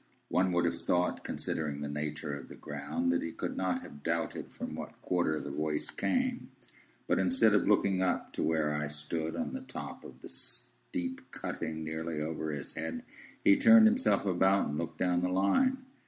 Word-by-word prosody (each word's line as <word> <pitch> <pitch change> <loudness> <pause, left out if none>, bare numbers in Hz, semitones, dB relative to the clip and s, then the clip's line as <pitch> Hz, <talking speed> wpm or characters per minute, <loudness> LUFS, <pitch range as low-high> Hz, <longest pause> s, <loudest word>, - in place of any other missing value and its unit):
One 95 0 +2
would 85 0 +3
have 85 - -1
thought, 90 0 +1
considering 75 -2 -2
the 75 - -2
nature 75 +1 -3
of 70 - -9
the - - -9
ground, 75 +4 -2
that 85 - +1
he 85 - -3
could - - -4
not - - 0
have 70 - -11
doubted 85 +2 -2
from - - -6
what - - -7
quarter 85 -4 +1
the 70 - -5
voice 75 +1 -1
came; 255 -1 0 0.6
but - - +2
instead 255 - +4
of 105 - +3
looking 100 -2 +3
up 90 -1 0
to - - -2
where 80 -2 +1
I 75 0 -1
stood 75 +2 -3
on 250 - -3
the 265 - -4
top 260 - -7
of - - -12
the - - -9
steep 265 -1 -5
cutting 80 0 -4
nearly 80 0 -3
over 80 0 -3
his 70 -2 -5
head, 80 0 -4 0.4
he 100 - +7
turned 225 -1 +8
himself 230 - +3
about, 95 +1 +3
and 75 - -2
looked - - -4
down 90 -1 +2
the 90 - +1
Line. 100 - +3
85 Hz, 190 wpm, -31 LUFS, 75-100 Hz, 0.6 s, turned